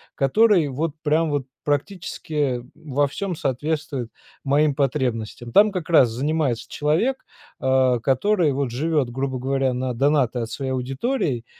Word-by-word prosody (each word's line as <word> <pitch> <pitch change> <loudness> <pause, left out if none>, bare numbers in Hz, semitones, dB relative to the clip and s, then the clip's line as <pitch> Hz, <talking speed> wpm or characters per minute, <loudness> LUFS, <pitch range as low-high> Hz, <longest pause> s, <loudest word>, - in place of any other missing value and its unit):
который 175 +3 +4
вот 150 +4 -2
прям 155 +1 +2
вот 140 -3 -1 0.2
практически 145 -4 -2
во 145 -1 0
всём 185 +6 -4
соответствует 140 -2 -2 0.3
моим 145 +1 +3
потребностям. 120 -4 -2
Там 210 +1 +6
как 180 -4 -5
раз 130 -8 +6
занимается 135 -1 -1
человек, 165 - 0 0.4
э, 130 -2 +3
который 165 +4 +2
вот 135 -2 -2
живет, 145 0 0
грубо 130 +1 -3
говоря, 135 0 0
на 125 0 -2
донаты 135 -1 +2
от 115 -1 -3
своей 135 +1 -3
аудитории 130 - -2
140 Hz, 135 wpm, -23 LUFS, 130-155 Hz, 0.4 s, Там